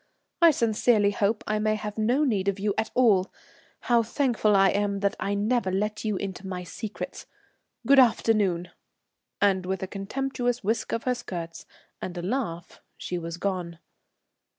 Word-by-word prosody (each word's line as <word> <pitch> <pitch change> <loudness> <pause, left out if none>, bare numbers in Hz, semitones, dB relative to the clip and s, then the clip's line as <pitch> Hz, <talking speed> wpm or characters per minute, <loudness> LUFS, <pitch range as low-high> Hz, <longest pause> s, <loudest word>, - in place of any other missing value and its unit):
I 340 - +9
sincerely 220 -5 +2
hope 205 +2 0
I 215 0 0
may 215 0 +1
have 210 -1 -5
no 245 +7 +2
need 205 -9 0
of 200 -1 +1
you 205 0 0
at 220 0 -1
all. 210 -7 +4 0.5
How 235 -1 +3
thankful 230 -3 +1
I 195 0 +5
am 200 0 0
that 200 0 +1
I 200 - -1
never 210 -1 0
let 210 +3 -2
you 215 -2 -1
into 190 0 -5
my 180 -1 -4
secrets! 210 +4 -7 0.6
Good 275 +3 +6
afternoon," 210 -7 +2 0.7
and 195 -2 +3
with 190 0 -2
a - - -3
contemptuous 245 +5 -2
whisk 220 +4 -1
of 230 - -2
her 255 - +1
skirts 170 -8 -7 0.3
and 180 -1 -5
a 175 - -4
laugh, 180 -6 -4 0.2
she 180 - -4
was 165 0 -6
gone. 180 -3 -3
205 Hz, 165 wpm, -26 LUFS, 190-230 Hz, 0.7 s, I